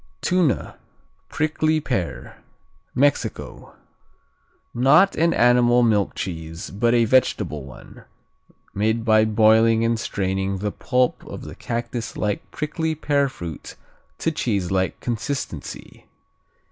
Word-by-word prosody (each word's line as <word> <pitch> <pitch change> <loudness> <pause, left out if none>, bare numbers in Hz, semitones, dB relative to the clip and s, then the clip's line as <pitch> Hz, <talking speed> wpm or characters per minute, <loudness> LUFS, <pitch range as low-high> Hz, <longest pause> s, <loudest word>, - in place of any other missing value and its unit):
Tuna, 175 -6 0 0.5
Prickly 155 0 0
Pear 90 - -4 0.6
Mexico 140 +2 -1 1.0
Not 150 +11 +4
an 170 +1 +2
animal 120 -1 +4
milk 105 -4 +1
cheese, 80 -2 -6
but 115 +4 +1
a 120 -1 +4
vegetable 105 - +1
one, 65 - -14 0.7
made 110 +3 0
by 110 -1 +5
boiling 110 +1 +4
and 115 0 +1
straining 95 -2 -2
the 105 +2 -2
pulp 125 +2 0
of - - -8
the - - -8
cactuslike 115 -3 -3
prickly 160 +1 -3
pear 145 -2 +1
fruit 85 - -8 0.4
to 165 - -1
cheeselike 95 - -1
consistency. 120 +4 -5
115 Hz, 105 wpm, -22 LUFS, 100-135 Hz, 1.0 s, by